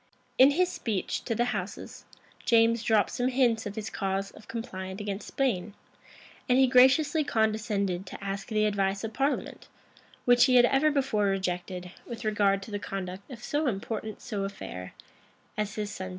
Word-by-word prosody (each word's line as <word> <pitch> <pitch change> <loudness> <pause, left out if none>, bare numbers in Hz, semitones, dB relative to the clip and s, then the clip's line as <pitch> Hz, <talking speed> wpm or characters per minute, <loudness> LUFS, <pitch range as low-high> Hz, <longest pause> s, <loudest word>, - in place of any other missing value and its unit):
In 260 +2 +9
his 360 +6 +2
speech 210 -5 -2
to 230 - -1
the 240 - +2
houses, 200 -1 -6 0.4
James 230 -1 +4
dropped 220 -2 +2
some 245 - 0
hints 245 -4 +2
of 205 - -7
his 220 0 -5
cause 195 0 -2
of 215 - -16
complaint 190 -5 -6
against 205 -1 -4
Spain; 215 -7 -1 0.7
and 250 - +5
he 265 - +6
graciously 265 +5 +5
condescended 215 -6 0
to - - -7
ask 195 0 -4
the 215 -2 +1
advice 200 -1 0
of 225 0 -4
parliament, 275 +5 -2 0.6
which 245 0 +6
he 255 -2 +3
had 245 -1 +8
ever 270 +5 +3
before 270 -8 +1
rejected, 180 -1 -2 0.2
with 235 -1 -7
regard 200 -2 +2
to 215 - -10
the 205 - -2
conduct 195 +1 -6
of 240 -3 -10
so 295 +1 0
important 215 0 -4
so 210 -6 -3
affair 90 - -7 0.6
as 210 -1 -2
his 210 -1 -3
son's - - -8
marriage. 185 0 -4
215 Hz, 175 wpm, -28 LUFS, 195-245 Hz, 0.7 s, In